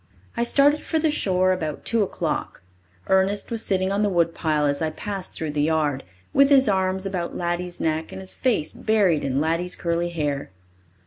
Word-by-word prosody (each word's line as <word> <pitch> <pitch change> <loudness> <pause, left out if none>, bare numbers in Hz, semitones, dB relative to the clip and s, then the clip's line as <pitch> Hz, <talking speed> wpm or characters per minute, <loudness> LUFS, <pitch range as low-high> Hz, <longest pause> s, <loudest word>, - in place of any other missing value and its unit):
I 235 - 0
started 285 +4 +4
for 320 - -1
the 315 -1 +2
shore 185 -9 +2
about 160 -5 -3
two 230 -1 +1
o'clock. 190 - -3 0.4
Ernest 190 +3 +1
was 230 -1 -2
sitting 190 -1 0
on 200 +1 0
the 210 - +2
woodpile 165 -4 +1
as 140 +1 0
I 160 - +1
passed 195 +3 -5
through 160 -2 -3
the 145 0 -1
yard, 150 -3 0 0.3
with 275 0 +5
his 270 -3 +5
arms 190 -1 0
about 180 -3 -3
Laddie's 175 0 -2
neck 160 0 -1
and - - -7
his 190 0 -2
face 225 - 0
buried 200 -8 +2
in 135 0 0
Laddie's 165 +4 -1
curly 170 0 -1
hair. 145 -4 -3
180 Hz, 185 wpm, -23 LUFS, 160-205 Hz, 0.4 s, with